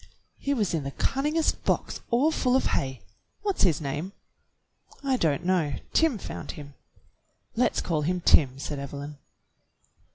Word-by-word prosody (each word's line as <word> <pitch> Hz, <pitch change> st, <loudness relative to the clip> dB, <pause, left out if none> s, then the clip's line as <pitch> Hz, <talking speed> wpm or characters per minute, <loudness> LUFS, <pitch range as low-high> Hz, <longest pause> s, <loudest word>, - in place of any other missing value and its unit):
He 280 Hz, 0 st, 0 dB
was 210 Hz, -8 st, 0 dB
in 160 Hz, -3 st, 0 dB
the 140 Hz, -, -3 dB
cunningest 300 Hz, -, 0 dB
box -, -, -1 dB
all 260 Hz, +7 st, +3 dB
full 255 Hz, -5 st, +2 dB
of 265 Hz, -, +3 dB
hay. 130 Hz, -2 st, -1 dB, 0.4 s
"What's 400 Hz, -2 st, 0 dB
his 170 Hz, -7 st, +4 dB
name.^" 150 Hz, +6 st, -4 dB, 0.9 s
"I 270 Hz, -1 st, +2 dB
don't 165 Hz, -, +1 dB
know. 175 Hz, -6 st, +2 dB, 0.2 s
Tim 320 Hz, -7 st, +3 dB
found -, -, -6 dB
him." 145 Hz, -4 st, -10 dB, 0.8 s
"Let's 245 Hz, +2 st, +2 dB
call 160 Hz, -4 st, 0 dB
him 180 Hz, +4 st, 0 dB
Tim," 135 Hz, -6 st, +5 dB
said 140 Hz, +1 st, -4 dB
Evelyn. 140 Hz, +1 st, -7 dB
175 Hz, 150 wpm, -27 LUFS, -, 0.9 s, Tim